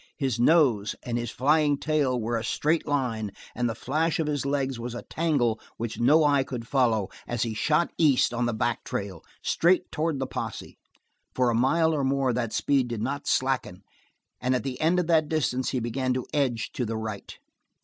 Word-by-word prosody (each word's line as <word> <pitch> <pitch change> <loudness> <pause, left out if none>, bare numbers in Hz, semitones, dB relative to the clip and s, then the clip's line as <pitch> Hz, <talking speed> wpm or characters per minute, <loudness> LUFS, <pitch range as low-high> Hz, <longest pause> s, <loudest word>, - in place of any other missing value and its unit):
His 130 -5 -1
nose, 120 -7 +3
and 120 - -3
his 120 -1 -2
flying 145 +3 +2
tail 145 -4 0
were 115 +1 -2
a 115 - -2
straight 155 +7 0
line 125 -7 -1 0.2
and 120 0 -1
the 115 - -3
flash 160 +5 -1
of 160 - +1
his 145 -2 -1
legs 135 -3 -1
was 120 +1 -5
a - - -6
tangle 140 -9 0 0.2
which 115 -1 -4
no 150 +7 +5
eye 140 -2 +3
could 120 -3 -6
follow 115 -8 +2 0.2
as 120 -1 -1
he 115 -2 -2
shot 150 +9 +1
east 140 -6 +4
on 120 0 0
the - - 0
back 120 +1 -1
trail, 95 -5 -5 0.2
straight 175 +2 +2
toward 155 -1 -1
the 135 - -2
posse. - - -6 0.6
For 125 -2 +2
a - - -1
mile 160 +7 +3
or 145 -3 0
more 135 -1 +1
that 115 -2 -2
speed 135 -3 +1
did 115 -3 -4
not 140 +3 -3
slacken, 130 -8 0 0.6
and 125 +1 +1
at 125 - -1
the 130 -2 -5
end 165 +3 +3
of 180 - 0
that 160 -2 +2
distance 130 -5 0
he 130 - -1
began 125 +2 -1
to 130 - -2
edge 130 -6 0
to 125 - -3
the 115 -1 -3
right. 110 -2 -6
130 Hz, 200 wpm, -26 LUFS, 120-145 Hz, 0.6 s, no